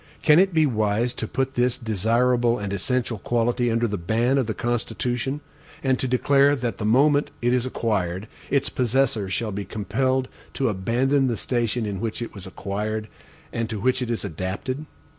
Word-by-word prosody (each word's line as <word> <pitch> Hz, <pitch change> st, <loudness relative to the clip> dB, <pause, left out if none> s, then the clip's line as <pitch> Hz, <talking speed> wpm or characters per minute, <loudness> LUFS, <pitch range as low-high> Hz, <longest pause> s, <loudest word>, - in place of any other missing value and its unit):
Can 150 Hz, +1 st, +6 dB
it 190 Hz, +1 st, +4 dB
be 160 Hz, -2 st, +4 dB
wise 110 Hz, -1 st, +1 dB
to 110 Hz, -, -4 dB
put 135 Hz, +3 st, -1 dB
this 125 Hz, 0 st, +1 dB
desirable 120 Hz, +2 st, +2 dB
and 100 Hz, -2 st, -4 dB
essential 120 Hz, +2 st, -1 dB
quality 120 Hz, +1 st, +1 dB
under 115 Hz, +1 st, +1 dB
the 105 Hz, -3 st, -3 dB
ban 115 Hz, +9 st, +2 dB
of 130 Hz, -, 0 dB
the 110 Hz, -, -2 dB
Constitution, 120 Hz, +3 st, -2 dB, 0.4 s
and 130 Hz, -2 st, +2 dB
to 130 Hz, -, -1 dB
declare 140 Hz, +3 st, +4 dB
that 120 Hz, -3 st, -3 dB
the 105 Hz, -, -2 dB
moment 145 Hz, +5 st, +4 dB
it 120 Hz, +1 st, +1 dB
is 125 Hz, 0 st, +1 dB
acquired, 100 Hz, -5 st, -1 dB, 0.2 s
its 140 Hz, 0 st, +2 dB
possessor 120 Hz, -5 st, +1 dB
shall 110 Hz, +2 st, -1 dB
be 100 Hz, +1 st, -3 dB
compelled 130 Hz, +6 st, -1 dB, 0.3 s
to 135 Hz, -, +1 dB
abandon 125 Hz, +8 st, +1 dB
the 120 Hz, -3 st, -1 dB
station 120 Hz, -1 st, -1 dB
in 100 Hz, -2 st, -3 dB
which 110 Hz, +1 st, -3 dB
it 120 Hz, -, -5 dB
was 95 Hz, -3 st, -8 dB
acquired, 105 Hz, +3 st, -3 dB, 0.4 s
and 115 Hz, -1 st, -2 dB
to 110 Hz, -3 st, -3 dB
which 130 Hz, +4 st, +1 dB
it 125 Hz, -, -2 dB
is 115 Hz, -3 st, -2 dB
adapted? 100 Hz, -, -4 dB
120 Hz, 180 wpm, -24 LUFS, 105-130 Hz, 0.4 s, Can